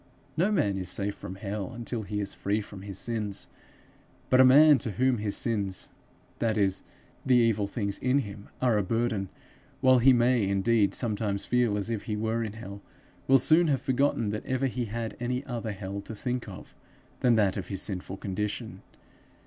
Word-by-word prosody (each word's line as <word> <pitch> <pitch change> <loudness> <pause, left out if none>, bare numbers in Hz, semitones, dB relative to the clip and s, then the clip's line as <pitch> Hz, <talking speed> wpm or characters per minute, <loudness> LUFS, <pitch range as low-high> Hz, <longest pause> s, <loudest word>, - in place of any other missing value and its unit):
No 180 +7 +2
man 100 - +1
is 90 -1 -4
safe 100 +1 -1
from 95 - -8
hell 100 +4 -5
until 120 -1 -4
he 105 0 -4
is 100 -1 -2
free 100 +2 -1
from 100 -2 -9
his 100 -1 -7
sins; 105 -4 -3 0.8
but 130 0 +7
a - - +8
man 145 +2 +7
to 110 -2 -3
whom 130 0 +1
his 105 -1 -1
sins, 100 -5 -2 0.5
that 115 -2 0
is 95 -2 +1 0.4
the 130 - +3
evil 115 -4 +3
things 100 -2 -3
in 130 +2 +2
him, 105 -6 -5
are 120 -4 +3
a - - 0
burden, 110 -2 -1 0.5
while 130 -2 +5
he 130 +3 +6
may 120 -3 +3
indeed 100 +2 +2
sometimes 105 -4 -1
feel 120 -4 +1
as 105 +3 -2
if 110 -3 -3
he 105 - -2
were 110 +2 -1
in 105 -2 -5
hell, 100 -2 -9 0.5
will 135 - +7
soon 160 +6 +4
have 135 -4 +1
forgotten 130 -5 +1
that 105 - -4
ever 130 +1 0
he 125 -2 -2
had 115 +1 -4
any 125 +2 -2
other 120 -4 -4
hell 100 0 -5
to 110 +2 -8
think 125 +2 -3
of 90 - -11 0.5
than 120 -2 +4
that 100 -3 +2
of 95 - -5
his 95 -1 -1
sinful 95 -1 -3
condition. 100 +2 -4
110 Hz, 190 wpm, -28 LUFS, 100-125 Hz, 0.8 s, a